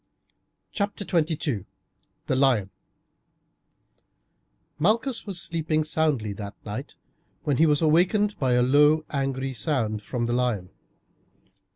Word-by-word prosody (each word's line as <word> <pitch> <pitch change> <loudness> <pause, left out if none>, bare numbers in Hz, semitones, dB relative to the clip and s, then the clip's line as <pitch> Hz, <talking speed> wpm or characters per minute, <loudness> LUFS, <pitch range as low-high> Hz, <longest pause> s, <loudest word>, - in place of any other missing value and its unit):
CHAPTER 200 0 -3
XXII: 155 - 0 0.6
THE - - 0
LION 125 -8 +2 2.1
Malchus 230 - +1
was 190 -3 -4
sleeping 160 -2 -1
soundly 150 -9 0
that 100 0 -7
night - - -6 0.5
when 140 -3 0
he 160 - +5
was 150 +1 +2
awakened 185 +7 +3
by 130 -3 +2
a 125 0 +4
low 150 +4 +4
angry 135 -1 -2
sound 110 -3 -1
from 120 +2 -3
the 120 - -1
lion. 120 -7 -1
145 Hz, 110 wpm, -25 LUFS, 125-165 Hz, 2.1 s, he